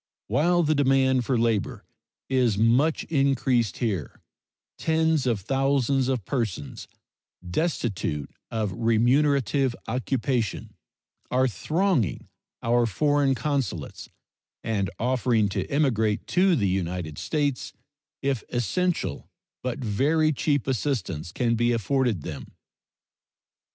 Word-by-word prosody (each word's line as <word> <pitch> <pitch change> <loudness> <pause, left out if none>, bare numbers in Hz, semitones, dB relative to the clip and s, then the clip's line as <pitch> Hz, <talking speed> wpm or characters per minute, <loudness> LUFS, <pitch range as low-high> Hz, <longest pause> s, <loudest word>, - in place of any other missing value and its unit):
While 175 +3 +2
the 155 0 +2
demand 135 -3 +3
for 130 0 +1
labor 115 -3 0 0.4
is 125 -6 +2
much 125 +9 +3
increased 135 - +1
here, 100 - -3 0.6
tens 160 -3 +1
of 115 -5 0
thousands 135 +2 +1
of 130 -7 -1
persons, 110 - -3 0.6
destitute 95 - -2 0.2
of 110 -4 -2
remunerative 130 +4 +2
occupation, 125 -2 -2 0.6
are 130 +1 +2
thronging 155 - 0 0.3
our 120 0 +3
foreign 145 +3 +2
consulates 135 -1 -3 0.5
and 100 -4 -1
offering 120 -3 +1
to 95 - -3
emigrate 115 -7 +1
to 185 0 +4
the 100 -9 +1
United 90 -4 -2
States 145 -4 -1 0.5
if 135 -4 0
essential, 125 - -1 0.3
but 125 -1 -3
very 145 +8 +1
cheap, 145 0 0
assistance 115 - -2
can 115 +3 0
be 120 +1 +2
afforded 115 - 0
them. - - -7
125 Hz, 105 wpm, -25 LUFS, 110-140 Hz, 0.6 s, to